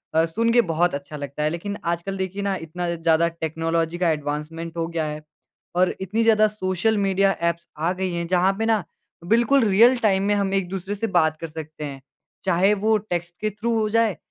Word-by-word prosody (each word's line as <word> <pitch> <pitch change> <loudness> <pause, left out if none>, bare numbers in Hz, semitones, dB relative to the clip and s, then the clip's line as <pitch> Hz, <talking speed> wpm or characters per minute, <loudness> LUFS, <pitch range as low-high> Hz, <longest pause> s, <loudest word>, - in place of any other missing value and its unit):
अ, 160 +1 +5
सुन 225 +8 0
के 240 - +6
बहुत 175 +2 +2
अच्छा 140 +2 -7
लगता 145 +1 -5
है 150 - +2
लेकिन 200 +5 -4 0.2
आजकल 195 +3 -4
देखिए 190 +1 -3
ना 200 -1 0
इतना 175 +2 -3
ज़्यादा 165 0 +3
टेक्नोलॉजी 165 0 -2
का - - +4
एडवांसमेंट 155 +2 -4
हो 165 0 -1
गया 165 -2 -2
है 150 0 -5 0.5
और 180 0 +2
इतनी 215 +5 0
ज़्यादा 215 -1 +5
सोशल 185 +3 0
मीडिया 195 0 +3 0.2
ऐप्स 170 0 -16
आ 165 +3 0
गई 185 -1 0
हैं 170 0 -2
जहाँ 185 +2 +3
पे 225 - +1
ना 220 -3 +2 0.5
बिल्कुल 240 +3 +3
रियल 230 +5 +5
टाइम 195 -1 +2
में 205 +1 +2
हम 200 -1 0
एक-दूसरे 195 +1 -2
से 225 +2 -2
बात 155 -1 +1
कर 165 - -3
सकते 155 -1 -8
हैं। 135 -2 -7 0.4
चाहे 190 +3 +3
वो 220 0 +4
टेक्स्ट 175 -4 -4
के 215 - +1
थ्रू 215 +3 -2
हो 215 -1 0
जाए 220 -6 +2
180 Hz, 205 wpm, -23 LUFS, 165-205 Hz, 0.5 s, के